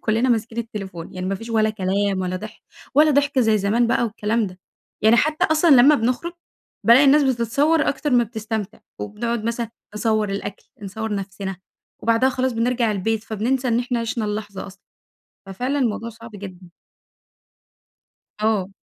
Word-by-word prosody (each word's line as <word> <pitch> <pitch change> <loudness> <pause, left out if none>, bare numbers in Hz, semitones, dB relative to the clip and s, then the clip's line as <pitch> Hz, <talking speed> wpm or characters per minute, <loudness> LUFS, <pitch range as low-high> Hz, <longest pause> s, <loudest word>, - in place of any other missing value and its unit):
كلنا 230 +4 +1
ماسكين 230 0 0
التليفون، 195 -7 -6
يعني 185 0 -4
ما 195 - -1
فيش 225 +4 -8
ولا 220 -1 +2
كلام 195 -1 -1
ولا 185 0 -2
ضحك، 215 +3 -9 0.3
ولا 300 +2 +6
ضحك 285 -1 +2
زي 220 -3 +3
زمان 220 +5 +2
بقى 240 - +1
والكلام 215 0 -1
ده، 180 0 -10 0.4
يعني 220 +2 +6
حتى 305 +4 +2
أصلًا 315 +2 +3
لما 275 +2 +8
بنخرج؛ 250 +9 -1 0.5
بالاقي 240 +5 +7
الناس 290 +2 +6
بتتصور 270 +5 +2
أكتر 295 +1 -1
ما 245 -1 +4
بتستمتع، 220 -2 -5 0.2
وبنقعد 230 +2 -3
مثلًا 230 0 -2 0.2
نصور 215 -1 +1
الأكل، 195 0 -5 0.2
نصور 215 +2 -4
نفسنا، 195 -1 -5 0.5
وبعدها 230 +3 +3
خلاص 260 -1 -1
بنرجع 235 0 +1
البيت 220 +3 -1
فبننسى 245 +4 -1
إن 230 0 +2
إحنا 245 -1 -1
عِشنا 230 -1 -2
اللحظة 210 -2 -4
أصلًا، 190 0 -14 0.6
ففعلًا 250 +9 -2
الموضوع 230 -2 -1
صعب 230 0 -12
جدًا. 185 -3 -10 1.7
آه. 215 -4 +1
225 Hz, 155 wpm, -22 LUFS, 205-245 Hz, 1.7 s, لما